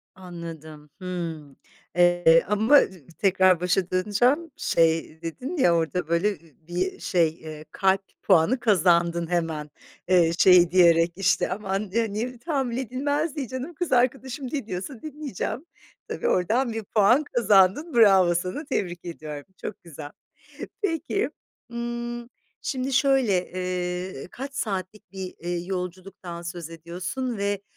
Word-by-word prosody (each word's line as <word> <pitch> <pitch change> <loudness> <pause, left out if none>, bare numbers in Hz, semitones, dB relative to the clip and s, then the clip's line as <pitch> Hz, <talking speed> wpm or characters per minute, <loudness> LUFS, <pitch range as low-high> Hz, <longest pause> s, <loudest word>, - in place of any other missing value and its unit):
Anladım. 165 -4 -10
Hımm, 165 -6 -5 0.4
eee, 175 -2 +5
ama 220 +8 +5 0.4
tekrar 185 -3 +4
başa 180 0 0
döneceğim, 240 - +1
şey 165 -1 +1
dedin 255 - -5
ya 175 - +4
orada 165 +1 -1
böyle, 170 +4 +2
ııı 200 - -5 0.3
,bir 180 +2 -2
şey, 170 -3 +2
eee, 155 -1 -10
kalp 190 0 +2 0.2
puanı 195 +7 +4
kazandın 170 -5 +2
hemen. 165 -4 -2 0.4
Eee, 175 -3 +4
şey 180 -2 +6
diyerek 170 -2 +5
işte 190 -1 +1
aman, 195 0 -3
eee, 225 0 0
niye 245 +4 -3
tahammül 265 -5 -2
edilmez, 285 +5 -1
diye, 280 -4 -3
canım, 260 +7 -6
kız 345 +2 -4
arkadaşım 260 +1 0
ne 275 -7 -3
diyorsa 220 +6 -6
dinleyeceğim. 300 - -5 0.4
Tabii, 480 - -3
oradan 230 - +1
bir 225 0 -4
puan 220 +7 +3
kazandın. 230 - +3
Bravo 195 -6 +5
sana, 185 - -3
tebrik 180 -10 -3
ediyorum, 155 -4 -7 0.2
çok - - -7
güzel. 150 -3 -9 0.7
Peki, 380 +2 -1 0.4
ımm, 240 0 -4 0.3
şimdi 265 -1 -2
şöyle, 260 -9 +2
eee, 180 -3 -4
kaç 275 +2 -7
saatlik 195 -2 -4
bir, 190 -1 -7
ııı, 175 0 -2
yolculuktan 180 -1 -6
söz 170 -1 -6
ediyorsun 185 +9 -5
ve 200 0 -1
190 Hz, 130 wpm, -25 LUFS, 175-245 Hz, 0.7 s, şey